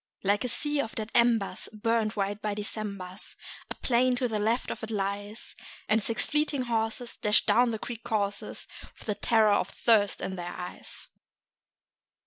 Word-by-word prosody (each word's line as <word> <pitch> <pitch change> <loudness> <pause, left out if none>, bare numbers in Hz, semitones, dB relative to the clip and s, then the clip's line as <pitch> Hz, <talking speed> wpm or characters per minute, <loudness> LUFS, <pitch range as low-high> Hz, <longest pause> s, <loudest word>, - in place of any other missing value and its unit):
Like 205 +3 +2
a - - 0
sea 295 +4 0
of 225 - -6
dead 220 0 -3
embers, 230 -6 +2
burnt 225 0 0
white 205 0 -1
by 210 -1 -1
Decembers, 205 -2 -4 0.3
A - - -4
plain 250 0 +2
to 250 0 0
the 220 -2 -1
left 225 +4 +1
of - - -5
it 220 - -4
lies; 205 +1 -3 0.3
And 220 +1 +4
six 225 +2 0
fleeting 300 -3 +2
horses 230 0 -2
dash 210 +1 +3
down 245 0 +5
the 225 - -1
creek 230 +1 -7
courses 205 -2 -1 0.3
With - - -12
the 210 - 0
terror 220 0 +4
of 195 - +1
thirst 205 -2 +3
in 190 - -4
their 175 0 -5
eyes. 180 0 -7
220 Hz, 170 wpm, -29 LUFS, 205-235 Hz, 0.3 s, down